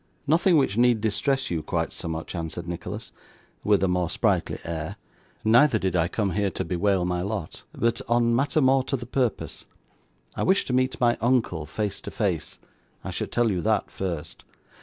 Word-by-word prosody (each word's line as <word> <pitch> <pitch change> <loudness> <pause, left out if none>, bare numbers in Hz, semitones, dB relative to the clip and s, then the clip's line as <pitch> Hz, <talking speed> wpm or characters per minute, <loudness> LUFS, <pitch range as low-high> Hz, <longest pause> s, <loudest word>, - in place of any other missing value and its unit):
'Nothing 165 +3 +4
which 125 -8 +1
need 120 -2 +4
distress 135 +5 0
you 85 -2 -1
quite - - -2
so - - -6
much,' 80 0 -4
answered 85 0 -5
Nicholas, 85 -1 -6 0.5
with 105 -2 +3
a - - +4
more 90 -2 0
sprightly - - 0
air; 80 -1 -4 0.5
'neither 120 +3 +6
did 95 -3 -1
I 85 -1 +3
come 100 +1 -1
here 100 +2 +1
to - - -4
bewail 95 0 +1
my 90 0 -1
lot, 100 -3 -4
but 115 0 0
on 120 0 +3
matter 145 +4 +2
more 130 0 +4
to 135 - -1
the 120 - -7
purpose. 125 -2 -2 0.7
I - - -3
wish 190 +1 +3
to 125 - -3
meet 130 +1 +1
my 120 -1 +3
uncle 115 -11 +1
face 105 +6 -3
to - - -6
face. - - -2 0.5
I - - -4
should - - -4
tell 120 -2 +2
you 90 -3 -1
that 110 0 +1
first. 85 -5 -5
105 Hz, 185 wpm, -25 LUFS, 90-125 Hz, 0.7 s, neither